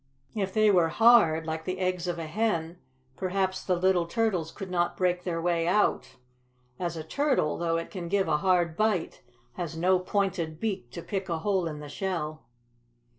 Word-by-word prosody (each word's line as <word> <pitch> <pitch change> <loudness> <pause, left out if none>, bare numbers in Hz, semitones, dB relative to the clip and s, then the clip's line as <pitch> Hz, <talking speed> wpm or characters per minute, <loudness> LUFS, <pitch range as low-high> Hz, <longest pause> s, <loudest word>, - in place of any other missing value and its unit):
If 195 -4 -2
they 215 +1 +4
were 175 -4 +4
hard, 205 -7 +5
like 160 0 -3
the 185 0 -2
eggs 185 -1 -1
of 175 - -2
a 165 - -4
hen, 170 -2 -1 0.4
perhaps 190 +1 -1
the 185 - +1
little 175 -1 +2
turtles 185 -6 0
could 190 -2 -8
not 175 -1 0
break 180 -1 +1
their 170 -2 -2
way 170 -1 0
out, 205 +4 +1 0.6
as 170 -2 -3
a 160 - -5
turtle, 260 - +1
though 165 -1 0
it 165 - -5
can 180 -3 -5
give 195 +1 +1
a 155 -2 +2
hard 175 -2 +2
bite, 210 -4 0 0.4
has 170 -2 -4
no 185 +2 +3
pointed 180 -4 -1
beak 190 - -3
to 170 - -6
pick 190 -2 -4
a 165 - 0
hole 185 +1 0
in 150 -2 -6
the 150 - -8
shell." 155 - -4
180 Hz, 185 wpm, -28 LUFS, 165-190 Hz, 0.6 s, hard